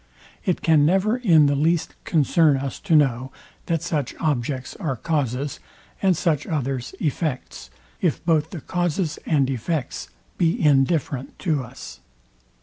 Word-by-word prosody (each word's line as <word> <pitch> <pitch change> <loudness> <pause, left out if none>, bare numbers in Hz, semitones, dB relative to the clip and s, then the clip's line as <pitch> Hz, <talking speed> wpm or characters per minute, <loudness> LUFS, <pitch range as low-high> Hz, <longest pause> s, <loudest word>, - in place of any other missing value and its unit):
It 180 - 0
can 160 -3 +5
never 195 +8 +3
in 170 -11 +5
the 145 - +3
least 160 +3 +1
concern 155 -1 +3
us 135 -1 -4
to 170 -6 +1
know, 130 -3 +2 0.4
that 165 -2 0
such 145 -6 -2
objects 130 -4 -2
are 155 -10 -2
causes, 140 0 -2 0.4
and 190 -4 +3
such 160 -6 0
others 135 -5 -3
effects, 150 -2 -3 0.3
if 175 -2 0
both 160 -2 +2
the 170 -4 -7
causes 175 -2 -1
and 145 -5 +3
effects 135 +2 -3 0.3
be 170 -2 +2
indifferent 140 -2 +1
to 155 -6 +1
us. - - -10
150 Hz, 140 wpm, -23 LUFS, 135-170 Hz, 0.4 s, can